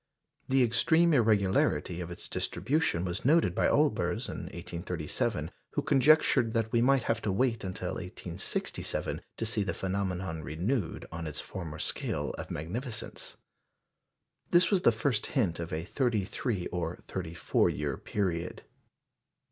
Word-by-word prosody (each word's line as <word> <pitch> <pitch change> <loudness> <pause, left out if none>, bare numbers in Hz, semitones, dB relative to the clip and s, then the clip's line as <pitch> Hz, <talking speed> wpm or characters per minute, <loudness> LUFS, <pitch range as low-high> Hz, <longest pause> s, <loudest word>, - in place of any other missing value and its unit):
The 130 0 +5
extreme 160 +9 +4
irregularity 95 - +2
of 85 - -5
its 85 - -6
distribution 135 - 0
was 90 0 -2
noted 150 - +4
by - - +2
Olbers - - +2
in - - -5
1837, 85 -2 -3 0.2
who - - 0
conjectured 130 -4 +4
that 110 -1 +1
we 115 - +3
might 135 0 +4
have 115 0 0
to 105 - 0
wait 115 +3 +1
until 90 -1 -3
1867 90 0 -3 0.2
to 115 - -2
see 110 -1 0
the 100 - -1
phenomenon 95 -3 -2
renewed 85 - -2
on 80 0 -5
its 75 - -3
former 80 -5 -6
scale - - -1
of - - -6
magnificence. 115 - -4 1.1
This 175 +3 +5
was 195 -3 +3
the 120 - +6
first 115 0 0
hint 95 -10 +2
of 85 -1 -4
a 80 +1 -3
thirty 115 -3 0
three 105 -2 -2
or 85 -1 -2
thirty 85 -3 -5
four - - +2
year 75 -2 -2
period. 90 -2 -2
100 Hz, 145 wpm, -30 LUFS, 85-120 Hz, 1.1 s, the